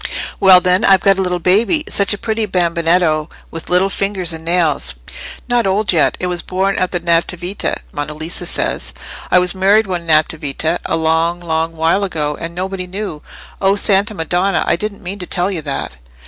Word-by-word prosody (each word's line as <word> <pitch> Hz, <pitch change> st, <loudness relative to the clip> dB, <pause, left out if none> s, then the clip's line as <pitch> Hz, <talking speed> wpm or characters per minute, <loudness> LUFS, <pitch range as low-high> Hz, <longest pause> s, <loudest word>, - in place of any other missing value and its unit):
"Well, 190 Hz, -2 st, +7 dB
then, 180 Hz, +1 st, +2 dB
I've 190 Hz, -2 st, +5 dB
got 195 Hz, -1 st, +3 dB
a -, -, +2 dB
little 180 Hz, -1 st, 0 dB
baby. 215 Hz, -, +2 dB
Such 200 Hz, -, +2 dB
a 205 Hz, -, +3 dB
pretty 220 Hz, +1 st, -2 dB
bambinetto, 170 Hz, -3 st, +1 dB, 0.2 s
with 165 Hz, -, -6 dB
little 185 Hz, +2 st, +3 dB
fingers 190 Hz, -4 st, -1 dB
and 160 Hz, 0 st, -8 dB
nails! 165 Hz, -, 0 dB, 0.5 s
Not 245 Hz, -3 st, +1 dB
old 195 Hz, +1 st, +1 dB
yet; 160 Hz, -, +2 dB
it -, -, -2 dB
was 175 Hz, -1 st, -2 dB
born 195 Hz, +1 st, -1 dB
at 185 Hz, -, 0 dB
the 175 Hz, -, -1 dB
Nativita, 175 Hz, +2 st, 0 dB
Monna 145 Hz, +1 st, -5 dB
Lisa 160 Hz, +3 st, -2 dB
says. -, -, -2 dB, 0.3 s
I -, -, +4 dB
was 180 Hz, 0 st, +3 dB
married 200 Hz, +3 st, +3 dB
one 175 Hz, -3 st, -4 dB
Nativita, 155 Hz, +1 st, 0 dB
a -, -, 0 dB
long, 165 Hz, +2 st, +1 dB
long 165 Hz, -1 st, -2 dB
while 165 Hz, +5 st, +1 dB
ago, 150 Hz, -6 st, -2 dB
and 165 Hz, +2 st, -7 dB
nobody 185 Hz, 0 st, -4 dB
knew. 190 Hz, -5 st, -6 dB, 0.4 s
O 195 Hz, 0 st, +3 dB
Santa 205 Hz, +1 st, +2 dB
Madonna! 180 Hz, +3 st, 0 dB
I -, -, +2 dB
didn't 205 Hz, +3 st, -5 dB
mean 195 Hz, +3 st, -6 dB
to 180 Hz, -, -6 dB
tell 180 Hz, +2 st, 0 dB
you 175 Hz, -5 st, -3 dB
that!" 140 Hz, -, -5 dB
180 Hz, 190 wpm, -16 LUFS, 165-195 Hz, 0.5 s, Well